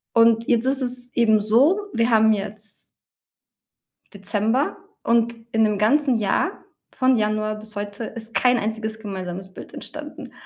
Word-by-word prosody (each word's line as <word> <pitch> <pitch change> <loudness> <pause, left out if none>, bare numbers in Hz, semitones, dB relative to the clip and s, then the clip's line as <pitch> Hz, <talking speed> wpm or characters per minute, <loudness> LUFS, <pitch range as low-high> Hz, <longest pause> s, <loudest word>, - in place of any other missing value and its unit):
und 230 0 +4
jetzt 235 0 +2
ist 270 0 +2
es 245 0 -1
eben 220 -2 +4
so, 255 - +4
wir 230 +1 +1
haben 220 -1 +5
jetzt 210 +1 -6 1.2
Dezember 215 - 0 0.3
und 235 0 +2 0.2
in 225 0 +2
'nem 210 -2 +1
ganzen 260 +4 +3
Jahr 225 - -1 0.3
von 255 -1 +2
Januar 215 0 0
bis 215 0 -11
heute 205 +2 -5
ist 225 0 -6
kein 250 -1 +3
einziges 220 0 -2
gemeinsames 190 -2 -6
Bild - - -11
entstanden. - - -8
220 Hz, 145 wpm, -22 LUFS, 210-240 Hz, 1.2 s, haben